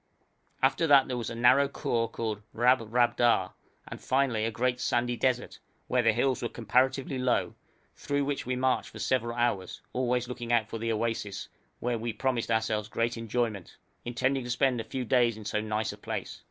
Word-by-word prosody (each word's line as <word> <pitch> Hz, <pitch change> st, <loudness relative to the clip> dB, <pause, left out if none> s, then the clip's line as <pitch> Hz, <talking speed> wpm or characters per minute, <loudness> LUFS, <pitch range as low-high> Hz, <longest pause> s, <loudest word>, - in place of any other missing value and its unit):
After 135 Hz, +5 st, +3 dB
that 140 Hz, -2 st, +6 dB
there 130 Hz, -, -2 dB
was 120 Hz, -2 st, -3 dB
a 115 Hz, -, -6 dB
narrow 130 Hz, +4 st, +5 dB
khor 115 Hz, -4 st, -1 dB
called 110 Hz, -2 st, -3 dB
Rabrabda, 120 Hz, -3 st, +3 dB, 0.3 s
and -, -, -8 dB
finally 130 Hz, -5 st, +1 dB
a -, -, +1 dB
great 125 Hz, +3 st, -1 dB
sandy 120 Hz, 0 st, 0 dB
desert, 125 Hz, 0 st, -1 dB, 0.3 s
where 125 Hz, -, +2 dB
the 115 Hz, -1 st, +4 dB
hills 125 Hz, +3 st, +1 dB
were 120 Hz, -, -2 dB
comparatively 130 Hz, +4 st, 0 dB
low, 125 Hz, -1 st, +1 dB, 0.4 s
through 145 Hz, 0 st, -1 dB
which 140 Hz, 0 st, -2 dB
we 125 Hz, +1 st, -2 dB
marched 130 Hz, 0 st, 0 dB
for -, -, -11 dB
several 120 Hz, -2 st, -1 dB
hours, 120 Hz, -6 st, -1 dB
always 125 Hz, -1 st, 0 dB
looking 120 Hz, -1 st, -5 dB
out 115 Hz, -2 st, +3 dB
for 115 Hz, -, -6 dB
the 115 Hz, +1 st, -1 dB
oasis, 110 Hz, -3 st, -2 dB, 0.3 s
where 120 Hz, -1 st, -1 dB
we 115 Hz, 0 st, -3 dB
promised 120 Hz, +1 st, -1 dB
ourselves 110 Hz, -2 st, 0 dB
great 115 Hz, +1 st, -1 dB
enjoyment, 115 Hz, -4 st, -3 dB, 0.3 s
intending 130 Hz, +2 st, 0 dB
to 120 Hz, -, -7 dB
spend 125 Hz, -1 st, +1 dB
a -, -, -9 dB
few 130 Hz, -2 st, -4 dB
days 120 Hz, -2 st, +3 dB
in 110 Hz, -, -10 dB
so 105 Hz, +1 st, -1 dB
nice 110 Hz, 0 st, -2 dB
a -, -, -12 dB
place. -, -, -5 dB
120 Hz, 185 wpm, -29 LUFS, 115-130 Hz, 0.4 s, that